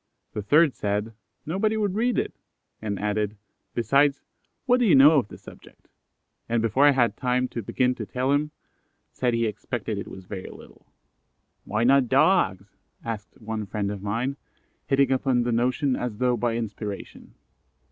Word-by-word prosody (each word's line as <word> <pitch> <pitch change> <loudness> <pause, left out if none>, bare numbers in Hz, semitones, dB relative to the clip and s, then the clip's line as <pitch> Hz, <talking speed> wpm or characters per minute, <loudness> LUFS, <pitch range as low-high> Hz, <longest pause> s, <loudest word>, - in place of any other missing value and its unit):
The 105 - -3
third 145 +7 +4
said, 105 +2 -2 0.3
"Nobody 215 +7 0
would 205 -3 0
read 235 +4 +1
it," - - -1 0.5
and 105 -2 -3
added, 105 0 -1 0.4
"Besides, 140 +5 +2 0.4
what 250 -1 +4
do 245 - +3
you 180 - +6
know 145 +3 +7
of 120 - -4
the - - -11
subject?" - - -16 0.6
and 115 0 +2
before 115 +6 +3
I - - +7
had 120 -3 +2
time 125 0 0
to 115 - -4
begin 125 +4 +1
to 110 -4 -7
tell 130 +6 -1
him, 145 +1 +1 0.6
said 125 -2 0
he 115 0 +1
expected 110 0 -4
it - - -6
was 95 -1 -10
very 95 0 -7
little. - - -15 0.8
"Why 105 +3 -1
not 130 0 +4
Dogs?" 120 - +2 0.3
asked 115 +3 -6
one 110 -2 -5
friend 100 0 -2
of 100 -2 -6
mine, 120 +7 -2 0.5
hitting 135 0 +3
upon 130 -2 +2
the 120 - -1
notion 125 +3 +1
as 120 -4 -4
though 125 +1 +2
by 120 0 -1
inspiration. 105 -3 -6
120 Hz, 165 wpm, -25 LUFS, 105-140 Hz, 0.8 s, know